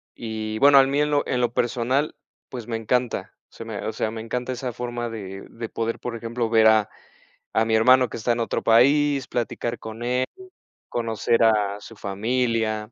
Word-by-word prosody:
Y, 110 -1 -4
bueno, 140 0 +7
a - - +7
mí 140 +2 0
en 150 0 +1
lo 145 -1 +2
en 125 - 0
lo 120 -1 0
personal, 125 +5 0 0.4
pues 120 -3 -7
me 115 - -3
encanta. 120 +2 -1 0.2
O - - -31
sea 115 - -8
me 110 -3 -5
o 110 - -3
sea 110 - -2
me 110 - -6
encanta 125 +3 -3
esa 125 -1 -4
forma 120 0 -4
de 95 -3 -7
de 115 -1 -7
poder, 115 0 -2
por 120 -1 -5
ejemplo, 115 0 -3
ver 110 -1 +5
a 110 -2 +4 0.7
a 110 - +3
mi 110 0 0
hermano 125 +3 +5
que - - -6
está 120 +2 +1
en 120 - -2
otro 115 - -1
país, 140 +4 +4
platicar 120 0 -3
con 110 +1 -8
él, 125 +1 0 0.6
conocer 115 0 0
a 105 -2 +2
su 115 - -12
familia. 110 +1 -1
115 Hz, 200 wpm, -24 LUFS, 110-125 Hz, 0.7 s, bueno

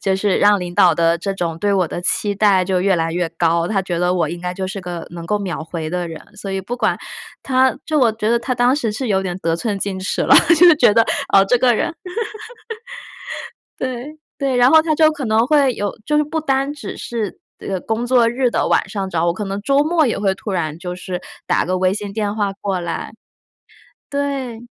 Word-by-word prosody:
就 195 - +1
是 195 -1 +1
让 205 -1 +4
领 175 -1 -5
导 175 -3 +5
的 165 +1 +2
这 195 +3 -3
种 170 -3 -3
对 205 +3 +1
我 185 -4 +1
的 175 - -5
期 205 +3 0
待 200 -3 +3
就 185 -1 0
越 195 0 +3
来 165 0 -1
越 175 -1 -1
高， 170 0 +1
他 200 -1 0
觉 175 -2 -3
得 180 0 +1
我 170 -4 0
应 170 +1 -6
该 180 0 -3
就 190 +1 -4
是 195 +1 -5
个 175 -2 -6
能 170 -1 -8
够 210 +2 0
秒 185 -5 -4
回 160 -1 -5
的 175 +1 -2
人。 160 -1 -8 0.2
所 200 -1 -6
以 195 - -2
不 235 +6 -5
管 250 - +1 0.5
他 260 0 +2
就 310 -1 +1
我 235 -4 +4
觉 220 0 -2
得 235 - +3
他 250 +2 -2
当 245 +2 +3
时 230 -8 -1
是 250 +3 -3
有 195 -2 +1
点 180 -1 -3
得 165 -2 -1
寸 205 +1 -2
进 195 -1 -3
尺 185 - -2
了， - - +5 0.2
就 345 -1 +8
觉 240 -7 +5
得， 230 - +5 0.3
哦， 195 - +6
这 245 - +4
个 245 -1 +4
人。 325 - -1 1.9
对， 260 +4 -5 0.2
对， 275 -3 0
然 245 +1 +6
后 315 +2 +7
他 315 -1 0
就 310 0 +5
可 290 -3 -5
能 220 +1 +3
会 280 -4 +3
有 205 -2 -3
就 300 0 +1
是 300 - +3
不 315 +1 -3
单 275 0 0
只 290 - -8
是， 225 -4 -4 0.2
呃， 190 -2 -3
工 225 +2 -2
作 245 -2 +4
日 245 +1 +1
的 - - 0
晚 - - +1
上 195 -2 -3
找 170 0 0
我， 170 - +2
可 205 +3 -5
能 195 +1 -4
周 275 +5 +2
末 315 0 +2
也 230 - -1
会 195 -1 +1
突 210 - -6
然 160 -4 -2
就 180 0 -5
是 180 0 -5 0.2
打 - - +1
个 185 +1 -1
微 185 +1 +2
信 205 -1 -5
电 210 0 -2
话 205 -2 0
过 195 -2 -3
来。 170 +4 -5 1.0
对。 270 -5 -3
205 Hz, 250 characters per minute, -19 LUFS, 180-245 Hz, 1.9 s, 就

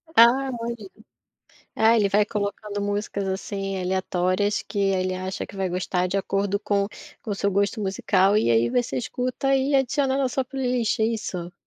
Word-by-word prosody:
Ah, 255 +4 +6
olha 235 +1 -3
aí. 200 -3 -10 0.9
Ah, 225 +1 +5
ele 205 -2 +3
vai 205 +1 +3
colocando 205 0 -3
músicas, 205 -1 -2
assim, 195 0 -3
aleatórias 185 +2 0
que 205 - -6
ele 185 -2 +1
acha 185 +1 -4
que 200 - -12
vai 190 -1 -1
gostar 180 0 -1
de 190 - -2
acordo 200 +1 0
com 200 -1 0 0.3
com 220 - -6
o - - 0
seu 200 +1 0
gosto 200 +2 0
musical. 195 0 +2
E 215 - +2
aí 115 +1 +3
você 245 -1 0
escuta 255 +2 -1
e 270 +1 +1
adiciona 270 0 +2
na 270 -2 +1
sua 265 +1 -1
playlist, 250 -4 -1
é - - +4
isso? 185 -6 -3
200 Hz, 180 wpm, -24 LUFS, 190-235 Hz, 0.9 s, Ah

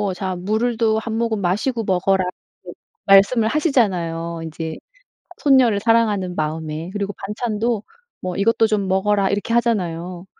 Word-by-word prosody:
자 185 0 -3
물도 220 +3 0
1 220 0 -4
모금 230 -3 -1
마시고 220 +6 0
먹어라." 190 0 +2 0.8
말씀을 200 +4 +5
하시잖아요 175 - 0
인제 160 0 -6 0.6
손녀를 260 -8 +4
사랑하는 210 -5 +1
마음에. 155 +1 -3
그리고 205 0 -3
반찬도 220 +1 -2 0.4
뭐 180 -1 -4
"이것도 225 +2 +3
좀 205 -3 0
먹어라." 195 +1 +2
이렇게 205 +3 -2
하잖아요. 180 -7 -1
200 Hz, 300 characters per minute, -20 LUFS, 180-225 Hz, 0.8 s, 말씀을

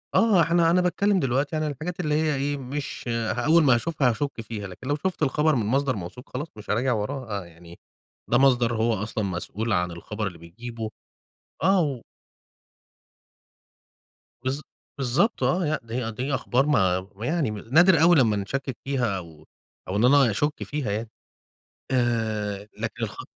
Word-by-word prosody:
آه. 215 -6 +5
إحنا 165 +1 +3
أنا 180 +1 +4
باتكلّم 190 +3 +2
دلوقتي 135 +1 0
عن 155 - 0
الحاجات 155 +5 -4
اللي 150 -3 0
هي 155 -1 +1
إيه، 140 +1 -1
مش 135 +1 -5
ه 115 -1 -1
أول 165 +1 +5
ما 130 -4 +5
هاشوفها 140 0 +1
هاشُك 140 0 -2
فيها. 105 -2 -6
لكن 95 +8 -10
لو 145 - +1
شُفت 180 +1 -2
الخبر 150 +2 +2
من 110 -4 0
مصدر 135 +2 +1
موثوق 100 +7 -8
خلاص 145 +5 -3
مش 105 - -11
هاراجع 125 +4 +2
وراه. 120 +3 -3
آه - - -11
يعني 85 0 -15 0.5
ده 120 - +4
مصدر 125 -3 +4
هو 115 +1 +2
أصلًا 110 +1 -2
مسؤول 100 +4 -2
عن 90 0 +1
الخبر 105 +5 -4
اللي 90 -3 -7
بيجيبه 110 +7 -7 0.7
آه، 190 +1 +4
و 135 -6 -2 2.4
بالض 130 +3 -2 0.4
بالضبط 140 - +1
آه. 180 0 +2
لأ، 155 +1 0
دي 115 0 -3
دي 130 +6 -3
أخبار 130 +1 +1
ما 95 -11 +3
ويعني 120 - -1
م 105 - -5
نادر 160 - +4
أوي 175 +1 +7
لمّا 115 -7 +4
نشكِّك 130 +6 -3
فيها 125 -7 0
أو 80 -4 -11 0.4
أو 95 - -3
إن 110 +4 +3
أنا 135 -3 +5
أشُك 145 +8 -1
فيها 145 -8 -3
يعني. 110 +2 -3 0.8
آآ 110 -5 0
لكن 115 +1 -4
الخ 105 - -7
125 Hz, 170 wpm, -25 LUFS, 110-150 Hz, 2.4 s, أوي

